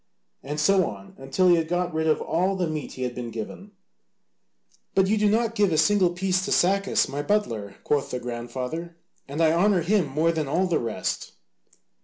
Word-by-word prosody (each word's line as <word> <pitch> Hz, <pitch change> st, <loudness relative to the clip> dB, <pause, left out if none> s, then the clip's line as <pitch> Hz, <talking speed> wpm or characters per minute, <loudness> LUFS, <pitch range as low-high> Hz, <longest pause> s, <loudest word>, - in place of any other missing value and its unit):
And 145 Hz, +2 st, -5 dB
so 185 Hz, +3 st, +3 dB
on 100 Hz, -2 st, -11 dB
until 135 Hz, +8 st, +1 dB
he 175 Hz, -, +6 dB
had 165 Hz, -1 st, -1 dB
got 175 Hz, 0 st, -1 dB
rid 160 Hz, 0 st, 0 dB
of 155 Hz, -, +2 dB
all 185 Hz, +4 st, 0 dB
the 185 Hz, -2 st, 0 dB
meat 155 Hz, -2 st, -4 dB
he 130 Hz, -, -5 dB
had 125 Hz, -1 st, -2 dB
been 120 Hz, -1 st, -5 dB
given. 115 Hz, -, -7 dB, 1.2 s
"But 190 Hz, -, +4 dB
you 205 Hz, +3 st, +2 dB
do 210 Hz, -1 st, +2 dB
not 230 Hz, +1 st, +1 dB
give 205 Hz, -4 st, +2 dB
a 155 Hz, -, +1 dB
single 200 Hz, 0 st, +4 dB
piece 185 Hz, +1 st, 0 dB
to 205 Hz, -, -4 dB
Sacas, 195 Hz, +2 st, +2 dB
my 140 Hz, +2 st, -3 dB
butler," 115 Hz, -, -1 dB
quoth 145 Hz, -2 st, 0 dB
the 125 Hz, -, -3 dB
grandfather, 125 Hz, +8 st, -5 dB, 0.3 s
"and 145 Hz, +4 st, -3 dB
I 160 Hz, -, +5 dB
honour 180 Hz, +1 st, +3 dB
him 190 Hz, -2 st, +2 dB
more 155 Hz, +5 st, +1 dB
than 155 Hz, -3 st, -2 dB
all 170 Hz, +7 st, +1 dB
the 175 Hz, -3 st, +1 dB
rest." 115 Hz, -2 st, -3 dB
165 Hz, 200 wpm, -25 LUFS, 135-190 Hz, 1.2 s, he